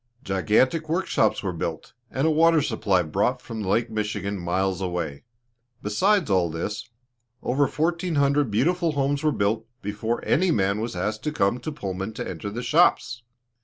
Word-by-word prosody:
Gigantic 120 - +1
work 180 +4 0
shops 110 - +1
were 95 -2 -2
built, 80 -1 -5 0.2
and 135 +3 -1
a 160 - +4
water 165 +1 +5
supply 100 -8 +1
brought 75 - 0
from 110 -1 -7
Lake 110 +4 0
Michigan, 105 -2 -2
miles 95 +2 -1
away. 90 -3 -3 0.6
Besides 165 - +2
all 90 -3 +3
this, 85 +6 -4 0.5
over 135 +3 +2
fourteen 170 +3 -1
hundred 140 -1 +2
beautiful 165 - +1
homes 140 0 0
were 155 -1 +2
built 110 -1 0 0.2
before 105 +3 -3
any 185 +4 +2
man 100 - +1
was 115 -3 -4
asked 105 +5 -2
to 150 - 0
come 110 -4 +1
to 155 - -5
Pullman 95 -6 -4
to 120 +2 -5
enter 105 - -5
the 120 +4 -5
shops. 120 0 +3
110 Hz, 165 wpm, -25 LUFS, 95-145 Hz, 0.6 s, water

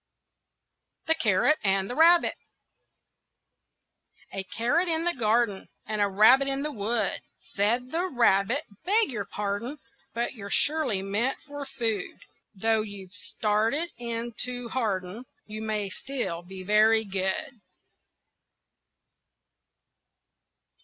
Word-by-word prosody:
THE 320 - +4
CARROT 290 +1 +2
AND 195 -1 +1
THE 245 - -4
RABBIT 335 +4 +5 2.0
A 195 - -3
carrot 245 - 0
in 330 0 0
a 345 - +1
garden 225 -3 +1 0.2
And 215 -1 -2
a 205 - +4
rabbit 220 +8 +6
in 275 0 0
the 300 - -2
wood. 225 0 -1 0.3
Said 235 +5 +1
the 345 +3 0
rabbit, 240 - +2 0.2
"Beg 415 +1 +2
your 210 -5 -3
pardon, 210 +7 -4 0.4
But 235 +2 -1
you're 200 -5 -8
surely 275 -8 +1
meant 210 +7 -1
for 285 -1 -7
food; 225 -7 -3 0.4
Though 220 +2 +2
you've 200 -3 -8
started 220 +10 0
in 235 0 -4
to 245 -1 -2
harden, 210 -2 -2 0.2
You 215 0 -7
may 210 -3 -2
still 245 -10 -4
be 185 +1 -9
very 215 +3 +4
good." 195 +5 -3
225 Hz, 115 wpm, -27 LUFS, 200-270 Hz, 2.0 s, rabbit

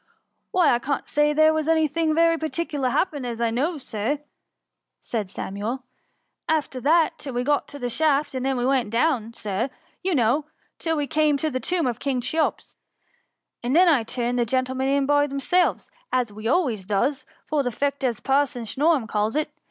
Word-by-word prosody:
" - - -51
Why 355 -7 +4
I 240 - +2
can't 275 +2 -2
say 295 0 +2
there 310 +1 +5
was 315 -1 -1
any 320 -1 +4
thing 310 +1 0
very 330 0 +4
particular 315 -4 -2
happened, 290 0 0
as 235 -2 -4
I 230 -1 +1
know 290 +9 0
of, 285 - -8
Sir,*" 235 +6 -2 0.8
said 215 -5 -4
Samuel, 210 +7 -4 0.3
" - - -48 0.3
after 295 -5 0
that, 320 +4 +3
till 270 -4 -7
we 245 - 0
got 290 +2 +1
to 285 - -10
the 245 - -3
shaft, 290 +2 +1
and 260 -1 -3
then 265 -1 0
we 245 - 0
went 260 -4 +2
down, 230 -2 0
Sir, 210 +5 -2 0.3
you 375 -2 0
know, 255 +4 +2 0.3
till 325 -1 -1
we 295 - 0
came 300 0 +2
to 310 +2 -1
the 255 - -2
tomb 350 +4 0
of 240 -3 -1
King 270 -3 -1
Cheops; 310 +6 -1 0.8
and 245 +4 -1
then 360 +2 +6
I 300 -8 +5
turned 240 +2 -2
the - - +4
gentlemen 260 +2 -1
in 275 0 +2
by 290 +1 +3
themselves, 290 +6 0 0.2
as 245 -4 0
we 215 +2 -5
always 250 - +1
does, 240 +9 -1 0.2
for 305 -2 0
the 250 -2 -1
'feet, 280 +4 -2
as 240 -4 0
Parson 270 -3 0
Snorum 280 +1 +1
calls 215 +3 -1
it. 300 0 0
275 Hz, 200 wpm, -24 LUFS, 240-310 Hz, 0.8 s, then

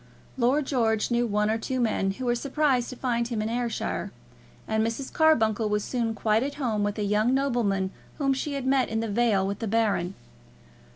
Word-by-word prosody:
Lord 265 +4 +2
George 225 -5 +1
knew 240 0 +2
one 210 0 +1
or 225 - 0
two 255 +3 -2
men, 205 -5 +1
who 255 +6 -6
were 240 - +2
surprised 270 0 +1
to 255 - -7
find 235 -2 -1
him 235 -3 -3
in 215 +1 -1
Ayrshire, 240 0 -2 0.6
and 220 0 +1
Mrs. 230 +4 -3
Carbuncle 225 -9 +3
was 210 0 0
soon 230 -3 -2
quite 215 0 +2
at 280 +2 -3
home 230 -8 -1
with 205 +1 -1
a 210 - -1
young 210 +5 +2
nobleman 225 -9 0 0.3
whom 275 -2 +2
she 285 +2 -3
had 275 -2 -3
met 265 -1 +2
in 225 0 -1
the 225 - -2
vale 210 -3 +2
with 200 0 -3
the 225 - -3
Baron. 200 -4 0
230 Hz, 205 wpm, -26 LUFS, 215-260 Hz, 0.6 s, Carbuncle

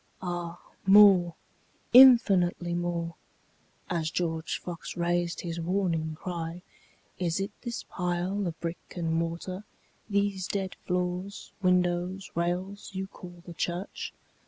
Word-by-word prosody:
Ah 175 -1 -4 0.3
more, 195 -4 +7 0.6
infinitely 195 -9 +7
more; 170 -1 -2 0.7
(As 165 -3 -1
George 165 -1 -2
Fox 175 -1 -7
rais'd 175 0 0
his 170 -1 -4
warning 165 -3 -1
cry, 170 -1 -5 0.6
"Is 175 -1 0
it 195 +1 -2
this 240 -2 -4
pile 180 +2 -2
of 165 -2 -5
brick 170 0 -6
and 165 -2 -1
mortar, 170 +4 -2 0.5
these 200 -2 0
dead 190 -2 -2
floors, 180 +2 -2
windows, 180 +1 +1
rails, 180 +4 -2
you 190 0 -3
call 175 -2 -12
the 175 - -8
church? 175 +3 -3
175 Hz, 115 wpm, -28 LUFS, 170-190 Hz, 0.7 s, more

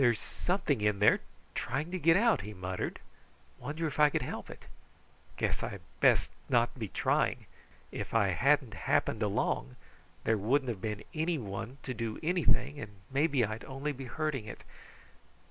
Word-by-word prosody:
"There's 120 -4 +4
something 175 - -1
in 105 -1 +2
there 105 +1 +5 0.3
trying 150 +7 -2
to 185 - -2
get 165 +1 +5
out," 230 +2 +4
he 105 0 -7
muttered. 90 0 -3 0.6
"Wonder 155 +3 -3
if 150 -1 -3
I 150 -1 +7
could - - 0
help - - -5
it? - - -11 0.7
Guess - - 0
I - - -3 0.2
best - - +4 0.2
not 120 -1 +3
be 110 - -2
trying. - - +1 0.5
If - - -5
I 110 -4 +3
hadn't 135 - +3
happened 100 +4 +1
along, 100 - 0 0.5
there 110 -1 +2
wouldn't 130 +6 +2
have 105 -6 -3
been 105 -1 -3
anyone 130 - -2
to 130 - -3
do 115 -2 -3
anything, 150 -5 +2
and 105 -6 -7 0.2
maybe 140 -3 +3
I'd 110 +2 -5
only 135 +3 -3
be 135 -1 -7
hurting 140 -2 -2
it. 110 - -9
125 Hz, 165 wpm, -32 LUFS, 105-150 Hz, 0.7 s, I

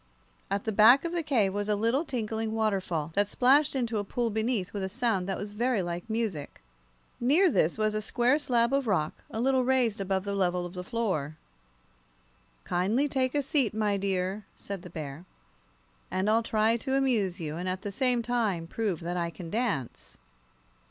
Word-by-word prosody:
At 200 +1 -1
the 220 - -1
back 225 - +6
of 340 - -2
the 345 -1 -1
cave 230 -11 +1
was 205 +1 -2
a 210 - +3
little, 230 +8 +1
tinkling 225 -6 -3
waterfall, 190 -8 -1
that 205 +2 +2
splashed 270 +7 +3
into 235 -4 0
a - - -1
pool 230 +3 -2
beneath 220 -3 -1
with 205 - -3
a 190 - -2
sound 220 -4 0
that 195 - -1
was 205 0 -6
very 230 -1 0
like 175 +4 -5
music. 220 -10 -3 0.6
Near 310 +9 +4
this 165 - +2
was 215 0 +1
a 215 - -1
square 245 +6 +2
slab 245 -4 +1
of 275 -3 +1
rock, 160 -7 -1
a 220 - -5
little 260 +1 +2
raised 245 -5 +1
above 190 -1 -1
the 200 0 -3
level 180 -2 0
of 175 - -8
the 180 -1 -5
floor. 185 - -2 1.3
"Kindly 210 +11 +1
take 260 -1 0
a 290 - +2
seat, 260 -6 +1
my 210 -2 +1
dear," 195 +1 -1
said 200 -2 -6
the 180 - -10
bear, 155 -1 -7 0.9
"and 185 +2 -1
I'll 225 +1 +4
try 225 0 +2
to 265 +3 -2
amuse 220 -9 +1
you, 155 -2 -4
and 180 +2 -3
at 185 +1 -4
the 205 - -3
same 250 +1 +1
time 220 -8 0
prove 195 -1 -2
that 175 +2 -3
I 170 -1 -1
can 170 -1 -9
dance." 210 - -2
215 Hz, 190 wpm, -28 LUFS, 185-245 Hz, 1.3 s, back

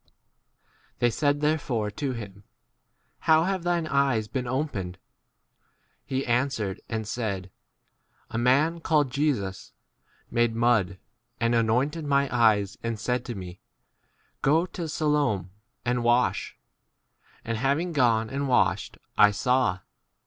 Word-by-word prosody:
* - - -38
They 120 -1 +2
said 145 +3 +1
therefore 135 -8 0
to 135 +4 -3
him, 100 -4 -8 0.8
How 160 0 +4
d 185 - 0
have 190 -2 -2
thine 175 -1 0
eyes 140 -7 +1
been 125 +2 -3
11 135 +5 0
opened? 95 -8 -6 1.1
He 135 -1 -2
c - - -5
answered 120 -5 -1
and 110 -2 -3
said, 100 -5 -3 0.8
A - - -3
man 145 +8 +3
called 150 -5 +1
Jesus 125 -10 -1 0.6
made 120 -1 +2
mud 115 -6 +2 0.4
and 115 +1 +1
anointed 125 +8 +1
my 140 -2 +1
eyes, 105 -4 +3
and 115 -2 -3
said 125 +3 -1
to 120 - -5
me, 90 -2 -8 0.8
Go 160 +5 +3
to 175 -2 -6
e - - -4
Siloam 145 - 0 0.3
and 120 0 0
wash: 120 +1 +1 0.9
and 115 -1 -2
having 145 +7 0
gone 115 -6 +3
and 140 +1 -2
washed, 125 - +1 0.2
I 105 - +8
saw. 125 -3 +1
125 Hz, 135 wpm, -26 LUFS, 110-145 Hz, 1.1 s, I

